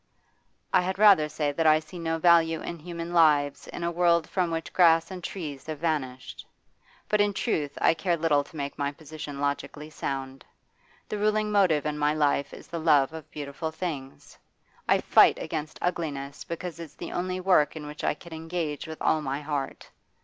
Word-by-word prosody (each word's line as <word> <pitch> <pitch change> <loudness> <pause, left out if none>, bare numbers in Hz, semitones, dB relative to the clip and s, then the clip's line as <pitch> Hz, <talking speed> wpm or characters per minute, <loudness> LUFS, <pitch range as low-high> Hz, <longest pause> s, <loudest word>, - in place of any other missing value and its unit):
'I - - +6
had 185 +1 -2
rather 195 -7 +6
say 150 -1 -1
that 160 +2 +1
I 155 0 +7
see 160 +3 -11
no 165 -1 -1
value 165 -1 +4
in 170 - -6
human 170 +1 -6
lives 150 -4 +3
in - - -6
a 170 - 0
world 170 -1 +3
from 180 -3 0
which 165 0 -4
grass 165 -1 +4
and 180 -2 -7
trees 150 -9 -6
have 155 -1 -4
vanished. 140 -5 -3 0.6
But, 210 0 +2
in 205 -1 +1
truth, 150 - -1
I - - +4
care 170 +1 0
little 155 -3 +2
to - - -17
make 140 -1 -5
my 140 0 0
position 150 -1 -8
logically 145 +2 -3
sound. 135 -3 -5 0.6
The 210 - -4
ruling 215 0 +1
motive 180 -8 +3
in 150 0 -2
my 150 +1 +2
life 145 -2 +1
is - - -11
the 170 - -5
love 150 -3 +3
of 160 -1 -9
beautiful 145 +2 -5
things; 155 -5 -6 0.5
I - - +4
fight - - +6
against 155 +1 -5
ugliness 145 -6 -3
because 170 -1 -6
it's 165 -3 -9
the 170 - -7
only 185 +1 -2
work 180 -6 +3
in 155 -1 -7
which 150 0 -8
I - - +1
can 170 +2 -12
engage 160 -1 -4
with 160 0 -8
all 155 - +2
my 135 -1 -2
heart. 145 -2 -4
160 Hz, 190 wpm, -27 LUFS, 145-170 Hz, 0.6 s, I